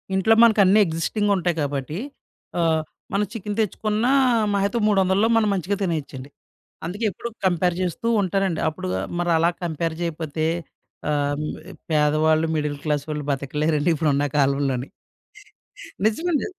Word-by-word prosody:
ఇంట్లో 190 +4 +4
మనకన్ని 210 -3 +5
ఎగ్జిస్టింగుంటాయి 180 +2 0
కాబట్టి, 145 +2 -3 0.6
ఆహ్, 160 -1 +2 0.3
మనం 205 +1 +2
చికెన్ 210 -2 -5
తెచ్చుకున్న 215 +1 0 0.5
మాహా 200 0 +2
అయితే, 235 +4 -2
300లో 195 +1 +3
మనం 215 -2 +2
మంచిగా 195 +1 -1
తినేయొచ్చండి. 150 -7 -3 0.6
అందుకే 205 +7 -3
ఎప్పుడు 235 - -6 0.2
కంపేర్ 180 -1 +2
చేస్తూ 185 +5 -2
ఉంటానండి. 190 -2 0
అప్పుడు 155 -11 -6 0.3
మరలా 170 -1 +2
కంపేర్ 165 -1 -2
చేయపోతే, 160 -2 -2 0.7
ఆహ్, 145 -1 0
హ్మ్ 155 - -3 0.4
పేదవాళ్ళు, 155 +1 +3
మిడిల్ 150 -1 -2
క్లాస్ 145 -2 0
వాళ్ళు 150 -1 -4
బతకలేరండి 150 +3 0
ఇప్పుడున్న 145 -2 +1
కాలంలోని. 135 -2 +1 1.2
నిజమండి. 300 +8 +1
165 Hz, 120 wpm, -23 LUFS, 150-200 Hz, 1.2 s, మనకన్ని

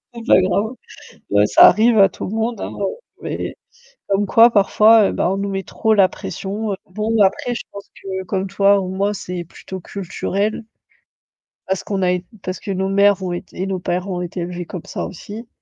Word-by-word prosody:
C'est 235 0 -9
pas 185 - +6
grave. 200 +5 0 0.6
Ouais, 100 +1 +4
ça - - +7
arrive 220 +3 +4
à 195 -1 +7
tout - - -8
le - - -5
monde 225 0 -2
hein, - - -4
heu, 200 - +1 0.4
mais - - -4 0.5
comme 200 +1 +1
quoi 230 +4 +6
parfois, 215 0 +5
heu, - - -4
bah 180 - 0
on 195 - 0
nous 200 0 -2
met 195 -1 -2
trop 220 +4 0
la 195 -2 +5
pression. 205 +4 -5
Heu, - - -2
bon 215 +3 -1
après 200 +5 +1
je - - -5
pense 200 0 -10
que 190 -1 -4
comme 190 +1 -2
toi 200 +1 +3
ou 185 - -4
moi, 200 +2 0
c'est 180 -2 -5
plutôt 185 +3 -9
culturel. 200 +4 -3 1.0
Parce 190 -1 -1
qu'on 195 -2 -2
a 180 0 +2
eu 180 0 -3 0.2
parce 185 0 -4
que 200 - -5
nos 190 0 -1
mères 200 0 +4
ont 180 - -2
été 175 +1 -6
et - - 0
nos 190 -1 -2
pères 180 +2 -2
ont 180 -2 -3
été 175 0 -5
élevés 175 0 -5
comme 175 -1 -7
ça - - -4
aussi 210 +6 -9
195 Hz, 215 wpm, -19 LUFS, 185-210 Hz, 1.0 s, ça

